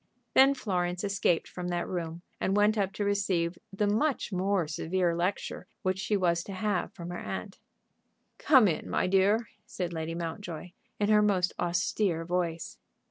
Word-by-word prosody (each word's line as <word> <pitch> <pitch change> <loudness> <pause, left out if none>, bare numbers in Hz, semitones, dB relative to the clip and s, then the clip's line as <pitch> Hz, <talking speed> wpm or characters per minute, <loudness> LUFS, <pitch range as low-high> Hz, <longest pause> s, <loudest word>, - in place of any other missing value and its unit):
Then 270 +1 +6
Florence 180 -6 -1
escaped 195 -4 +1
from 180 -1 -6
that 175 -1 -1
room 170 -1 -4 0.2
and 195 +2 +1
went 210 +1 +4
up 195 -3 0
to 205 - -2
receive 185 -4 0
the 195 +2 0
much 225 +6 +1
more 185 -2 +1
severe 170 +3 0
lecture 180 +3 -2 0.2
which 185 0 0
she 205 +1 +1
was 170 -3 +1
to 200 - -6
have 195 -1 -1
from 170 0 -7
her 175 - -5
aunt. 195 +1 -6 0.8
"Come 260 -8 +6
in, 165 - -2
my - - +1
dear," 200 +4 +3 0.2
said 175 -2 -4
Lady 160 0 -3
Mountjoy, 170 0 -5 0.3
in 205 0 +1
her 210 -1 +6
most 190 -3 +2
austere 175 0 0
voice. 170 -2 -2
185 Hz, 165 wpm, -29 LUFS, 175-205 Hz, 0.8 s, Then